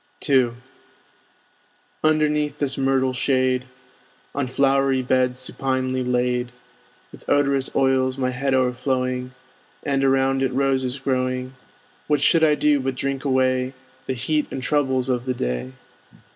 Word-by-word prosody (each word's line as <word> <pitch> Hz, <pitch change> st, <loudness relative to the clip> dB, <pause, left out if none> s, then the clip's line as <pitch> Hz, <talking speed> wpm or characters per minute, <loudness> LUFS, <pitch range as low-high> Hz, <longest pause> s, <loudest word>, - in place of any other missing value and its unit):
II 130 Hz, -4 st, +3 dB, 1.5 s
Underneath 150 Hz, -1 st, +1 dB
this 145 Hz, -2 st, -1 dB
myrtle 135 Hz, -1 st, +1 dB
shade, 130 Hz, 0 st, +1 dB, 0.7 s
On 140 Hz, -2 st, -1 dB
flowery 135 Hz, 0 st, +2 dB
beds 125 Hz, 0 st, +1 dB
supinely 130 Hz, -1 st, -2 dB
laid, 125 Hz, 0 st, 0 dB, 0.6 s
With -, -, -12 dB
odorous 140 Hz, -2 st, +2 dB
oils 130 Hz, -1 st, +2 dB
my 130 Hz, -1 st, 0 dB
head 135 Hz, +1 st, 0 dB
o'erflowing, 125 Hz, 0 st, -1 dB, 0.5 s
And 135 Hz, -1 st, 0 dB
around 135 Hz, 0 st, +2 dB
it 130 Hz, -1 st, 0 dB
roses 135 Hz, -1 st, 0 dB
growing, 130 Hz, -1 st, -2 dB, 0.5 s
What 150 Hz, -1 st, +2 dB
should 160 Hz, +3 st, +4 dB
I 150 Hz, -1 st, +5 dB
do 150 Hz, -1 st, +2 dB
but 135 Hz, 0 st, -2 dB
drink 135 Hz, 0 st, -3 dB
away 130 Hz, -1 st, +1 dB, 0.3 s
The 130 Hz, -, 0 dB
heat 150 Hz, +5 st, -1 dB
and 130 Hz, -, -5 dB
troubles 130 Hz, -3 st, +1 dB
of 125 Hz, -1 st, -1 dB
the 130 Hz, -1 st, -1 dB
day? 60 Hz, -, -3 dB
130 Hz, 130 wpm, -22 LUFS, 130-135 Hz, 1.5 s, I